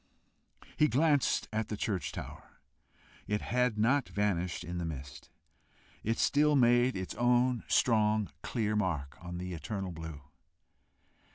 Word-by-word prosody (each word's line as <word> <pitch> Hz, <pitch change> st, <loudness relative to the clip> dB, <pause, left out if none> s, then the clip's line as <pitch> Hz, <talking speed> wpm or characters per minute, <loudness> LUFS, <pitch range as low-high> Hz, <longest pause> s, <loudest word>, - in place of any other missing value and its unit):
He 150 Hz, -, +5 dB
glanced 145 Hz, 0 st, +2 dB
at 110 Hz, 0 st, -1 dB
the 105 Hz, -, -4 dB
church 100 Hz, -4 st, -2 dB
tower. -, -, -9 dB, 0.7 s
It 105 Hz, 0 st, 0 dB
had 125 Hz, -2 st, +1 dB
not 125 Hz, +6 st, +2 dB
vanished 90 Hz, -4 st, -1 dB
in 85 Hz, 0 st, -5 dB
mist! 70 Hz, -4 st, -8 dB, 0.7 s
It 115 Hz, +2 st, 0 dB
still 150 Hz, +1 st, +3 dB
made 120 Hz, -2 st, +4 dB
its 95 Hz, -1 st, -4 dB
own 120 Hz, +1 st, +2 dB
strong, 110 Hz, -3 st, +2 dB
clear 110 Hz, -3 st, -1 dB
mark 85 Hz, -9 st, -2 dB
on 90 Hz, 0 st, -6 dB
the 90 Hz, 0 st, -5 dB
eternal 95 Hz, +4 st, -4 dB
blue! 80 Hz, -3 st, -8 dB
105 Hz, 125 wpm, -31 LUFS, 90-120 Hz, 0.7 s, He